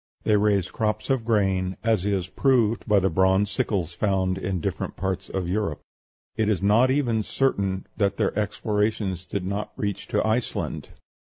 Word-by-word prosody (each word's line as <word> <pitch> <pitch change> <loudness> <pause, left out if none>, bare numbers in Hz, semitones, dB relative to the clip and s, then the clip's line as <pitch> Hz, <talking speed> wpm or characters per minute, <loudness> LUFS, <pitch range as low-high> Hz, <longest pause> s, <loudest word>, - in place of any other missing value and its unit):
They 105 - +3
raised 100 -3 +2
crops 110 +2 -1
of 130 -4 +1
grain, 95 -4 +1
as 110 -4 +1
is 95 -3 0
proved 115 -1 +2
by 105 -2 +5
the 95 0 +1
bronze 95 +4 +3
sickles 95 -3 -1
found 95 -1 0
in 95 -1 -2
different - - -3
parts 95 0 -3
of 95 -2 -2
Europe. 95 -4 -1 0.6
It 110 -1 +1
is 105 -5 +1
not 105 +6 +4
even 125 -5 +1
certain 100 -6 0
that 100 -2 +1
their - - 0
explorations 105 -2 -1
did 100 -2 -3
not 100 +2 -3
reach 100 -2 -3
to - - 0
Iceland. 110 +2 -2
100 Hz, 165 wpm, -25 LUFS, 95-110 Hz, 0.6 s, by